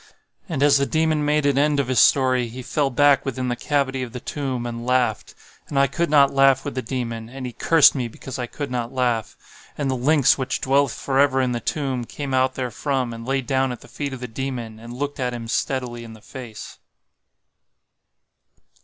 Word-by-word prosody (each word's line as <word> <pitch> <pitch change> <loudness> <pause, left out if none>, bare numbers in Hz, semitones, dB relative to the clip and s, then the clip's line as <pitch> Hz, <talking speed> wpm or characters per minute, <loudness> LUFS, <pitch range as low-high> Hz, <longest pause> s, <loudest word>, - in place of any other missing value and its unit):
And 145 -4 0
as 145 -1 +5
the 140 - +1
Demon 155 -1 +1
made 150 0 +1
an 140 -1 +3
end 145 0 +2
of 140 - 0
his 130 -3 +2
story, 130 -2 +4
he 125 +3 -8
fell 145 +2 0
back 140 +2 +4
within 130 -1 -3
the 120 - 0
cavity 135 0 -1
of 125 -2 -6
the 125 - -5
tomb 130 -2 -4
and 120 0 -5
laughed. 125 -3 0 0.3
And 145 - -4
I 140 - +5
could 165 +5 -1
not 140 -2 +5
laugh 135 -1 +4
with 145 - -3
the 130 - -2
Demon, 115 -2 -4
and 130 +1 -7
he 125 - -4
cursed 160 +5 +5
me 125 -4 -2
because 130 +3 -8
I 125 - -3
could 145 +2 -6
not 120 -1 -2
laugh. 125 -4 -1 0.4
And 140 -2 -1
the - - 0
lynx 140 +2 +3
which 130 0 -2
dwelleth 135 0 +2
forever 135 +1 +2
in 130 -1 +1
the 120 - -1
tomb, 130 -3 -2
came 140 +2 -5
out 130 0 +2
therefrom, 130 0 -2
and 115 +1 -8
lay 135 0 +1
down 130 0 0
at 125 - -7
the - - -14
feet 145 -1 -5
of 130 - -7
the 125 - -4
Demon, 120 -2 -5
and 115 +1 -10
looked 140 +4 -4
at 125 -1 -1
him 115 -1 -6
steadily 120 0 -2
in 115 -1 -10
the 110 - -14
face. 120 -2 -10
130 Hz, 215 wpm, -22 LUFS, 120-140 Hz, 0.4 s, as